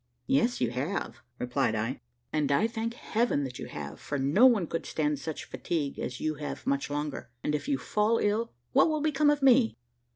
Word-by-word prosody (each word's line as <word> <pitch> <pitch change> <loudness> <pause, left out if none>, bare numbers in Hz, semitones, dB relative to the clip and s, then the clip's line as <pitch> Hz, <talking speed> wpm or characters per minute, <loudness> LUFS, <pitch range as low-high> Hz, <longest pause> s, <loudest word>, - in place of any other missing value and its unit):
"Yes, 250 -3 +2
you 120 -2 +1
have," 130 - -3 0.2
replied 125 -2 0
I, 115 +5 -2 0.3
"and 150 -2 +1
I 140 +10 +4
thank 230 0 -3
Heaven 235 - 0
that 125 -2 -6
you - - -5
have, - - -7
for 145 - -3
no 145 - +5
one 220 -8 +3
could 165 +1 -4
stand 150 -2 0
such 160 +1 -5
fatigue 150 -5 -3
as 125 - -4
you 155 - 0
have 145 - -5
much 140 +1 0
longer; 145 -2 -3
and 150 - 0
if 150 - -2
you 285 -2 +1
fall 215 0 +1
ill, 220 +3 0 0.2
what 320 - +5
will 310 -1 0
become 300 -1 +3
of 295 -1 +2
me?" 255 -3 +5
165 Hz, 200 wpm, -29 LUFS, 140-235 Hz, 0.3 s, no